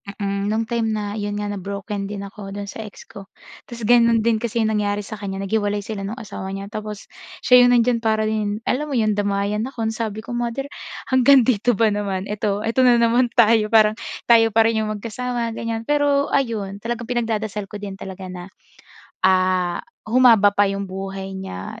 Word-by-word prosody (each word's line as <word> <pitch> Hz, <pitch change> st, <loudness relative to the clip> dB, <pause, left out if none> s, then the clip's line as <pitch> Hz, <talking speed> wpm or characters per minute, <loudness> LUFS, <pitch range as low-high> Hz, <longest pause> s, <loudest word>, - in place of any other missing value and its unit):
mm, 200 Hz, -1 st, -2 dB
no'ng 220 Hz, +2 st, 0 dB
time 230 Hz, 0 st, -1 dB
na 210 Hz, 0 st, -4 dB
'yon 205 Hz, 0 st, -3 dB
nga 205 Hz, 0 st, -3 dB
na-broken 200 Hz, +1 st, -5 dB
din 200 Hz, -1 st, -6 dB
ako 200 Hz, -1 st, -9 dB
do'n 205 Hz, -, -4 dB
sa 220 Hz, -, -7 dB
ex -, -, -13 dB
ko, 195 Hz, -1 st, -11 dB, 0.4 s
tapos 235 Hz, -1 st, -8 dB
gano'n 230 Hz, -1 st, +4 dB
din 230 Hz, -1 st, +2 dB
kasi 230 Hz, 0 st, -1 dB
'yong 220 Hz, -, +1 dB
nangyari 205 Hz, 0 st, -1 dB
sa 210 Hz, +1 st, -8 dB
kanya 195 Hz, -1 st, -4 dB
naghiwalay 205 Hz, 0 st, -1 dB
sila 200 Hz, -3 st, -5 dB
no'ng 230 Hz, +5 st, -6 dB
asawa 190 Hz, -1 st, -6 dB
niya 195 Hz, 0 st, -6 dB
tapos, 215 Hz, -1 st, -6 dB, 0.4 s
siya 250 Hz, 0 st, +7 dB
'yong 245 Hz, -, +5 dB
nandiyan 235 Hz, 0 st, +3 dB
para 220 Hz, -1 st, +1 dB
din 215 Hz, 0 st, -2 dB
alam 295 Hz, +6 st, -1 dB
mo 280 Hz, -, -3 dB
'yong 215 Hz, -2 st, +2 dB
damayan 205 Hz, +2 st, -1 dB
ako. 245 Hz, -4 st, -5 dB
Ansabi 220 Hz, -1 st, -4 dB
ko, -, -, -9 dB
"Mother 240 Hz, +4 st, -3 dB, 0.4 s
hanggang 260 Hz, 0 st, +6 dB
dito 240 Hz, 0 st, +2 dB
ba 220 Hz, +1 st, +3 dB
naman 200 Hz, -2 st, -2 dB
eto, 210 Hz, 0 st, -1 dB
eto 225 Hz, +3 st, -1 dB
na 240 Hz, -, +6 dB
naman 235 Hz, +2 st, +3 dB
tayo. 225 Hz, -2 st, +5 dB
Parang 215 Hz, 0 st, +4 dB, 0.2 s
tayo 225 Hz, -2 st, +4 dB
pa 225 Hz, -, +6 dB
rin 225 Hz, 0 st, +1 dB
'yong -, -, -3 dB
magkasama," 235 Hz, +1 st, -3 dB
ganyan. 225 Hz, 0 st, -4 dB
Pero 290 Hz, 0 st, +1 dB
ayun 210 Hz, -7 st, -1 dB
talagang 235 Hz, +1 st, -4 dB
pinagdadasal 220 Hz, -4 st, -2 dB
ko 210 Hz, -, -11 dB
din 200 Hz, -1 st, -7 dB
talaga 190 Hz, 0 st, -8 dB
na, 180 Hz, 0 st, -8 dB, 0.8 s
ah, 185 Hz, -1 st, +2 dB, 0.2 s
humaba 225 Hz, -4 st, +5 dB
pa 205 Hz, 0 st, +3 dB
'yong 195 Hz, 0 st, -3 dB
buhay 195 Hz, 0 st, -6 dB
niya, 95 Hz, -, -7 dB
215 Hz, 195 wpm, -21 LUFS, 200-230 Hz, 0.8 s, siya